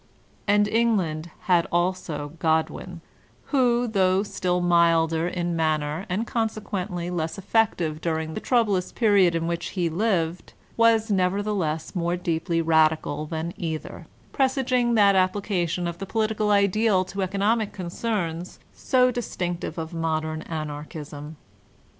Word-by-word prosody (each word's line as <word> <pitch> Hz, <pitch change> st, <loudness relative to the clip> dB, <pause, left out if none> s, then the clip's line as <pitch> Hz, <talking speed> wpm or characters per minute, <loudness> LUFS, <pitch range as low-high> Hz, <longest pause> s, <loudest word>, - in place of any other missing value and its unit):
'' -, -, -34 dB
And 205 Hz, +1 st, +4 dB
England 195 Hz, -9 st, 0 dB
had 175 Hz, -4 st, +2 dB
also 175 Hz, -4 st, -1 dB
Godwin, 160 Hz, +2 st, -1 dB, 0.5 s
who, 245 Hz, -3 st, +3 dB
though 190 Hz, -3 st, +2 dB
still 180 Hz, -3 st, -1 dB
milder 165 Hz, -1 st, +3 dB
in 175 Hz, -1 st, -2 dB
manner 155 Hz, +3 st, -1 dB
and 200 Hz, +6 st, -1 dB
consequently 200 Hz, -6 st, -3 dB
less 165 Hz, -1 st, -2 dB
effective 185 Hz, -6 st, 0 dB
during 160 Hz, -1 st, -2 dB
the -, -, -3 dB
troublous 210 Hz, -7 st, +1 dB
period 200 Hz, -7 st, +3 dB
in 165 Hz, 0 st, -1 dB
which 170 Hz, 0 st, -2 dB
he 175 Hz, -2 st, +1 dB
lived, 175 Hz, -3 st, -1 dB, 0.2 s
was 225 Hz, -1 st, +3 dB
nevertheless 185 Hz, -4 st, 0 dB
more 175 Hz, 0 st, 0 dB
deeply 165 Hz, -1 st, -1 dB
radical 155 Hz, -1 st, +2 dB
than 160 Hz, +2 st, -4 dB
either, 160 Hz, -2 st, -5 dB, 0.3 s
presaging 255 Hz, -3 st, +1 dB
that 200 Hz, -2 st, +6 dB
applica 185 Hz, -1 st, +1 dB
tion 175 Hz, +2 st, -2 dB
of 170 Hz, 0 st, -5 dB
the 195 Hz, -, -5 dB
political 215 Hz, 0 st, 0 dB
ideal 200 Hz, -1 st, +3 dB
to 195 Hz, +2 st, -5 dB
economic 205 Hz, +3 st, 0 dB
concerns 180 Hz, -2 st, -3 dB, 0.2 s
so 255 Hz, -1 st, +2 dB
dis 245 Hz, -2 st, -5 dB
tinctive 175 Hz, -2 st, -3 dB
of 160 Hz, +1 st, -5 dB
modem 155 Hz, -1 st, -2 dB
Anarchism. 150 Hz, -1 st, -6 dB
180 Hz, 130 wpm, -25 LUFS, 165-210 Hz, 0.5 s, that